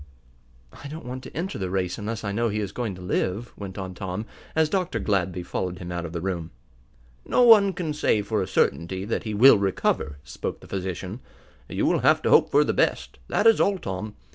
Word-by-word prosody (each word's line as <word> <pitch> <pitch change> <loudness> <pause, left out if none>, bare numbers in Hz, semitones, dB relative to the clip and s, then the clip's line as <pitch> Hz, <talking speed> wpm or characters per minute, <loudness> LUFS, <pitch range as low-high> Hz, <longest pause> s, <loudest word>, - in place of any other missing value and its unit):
"I - - -6
don't 155 -1 -8
want 125 +1 -5
to - - -10
enter 180 - -3
the 95 -1 -2
race 90 +1 -2
unless 110 +1 -4
I 100 - -2
know 115 +3 0
he 105 0 -2
is 100 -2 -3
going 110 -4 -3
to 90 - -10
live," 95 +5 -2
went 95 -2 -8
on 95 -1 -5
Tom, 95 +3 -5 0.3
as 160 0 +4
Dr. 180 +2 -1
Gladby 90 -3 -1
followed 90 0 -3
him 90 -1 -7
out 85 -1 -3
of - - -9
the 85 -1 -4
room. 85 -3 -3 0.7
"No 250 - +3
one 215 -4 +7
can 170 -5 -3
say 110 -7 +1
for 105 0 -1
a 95 - -2
certainty 95 +1 0
that 115 - -2
he 110 -1 -3
will 115 0 +7
recover," 90 -6 0
spoke 80 - -5
the - - -14
physician. 95 +2 -4 0.5
"You - - -1
will - - +3
have - - +3
to - - +1
hope - - +6
for - - +5
the - - 0
best, - - 0
that 205 - 0
is 225 -1 +6
all, 200 -1 +2
Tom. 105 - -5
100 Hz, 220 wpm, -25 LUFS, 90-125 Hz, 0.7 s, one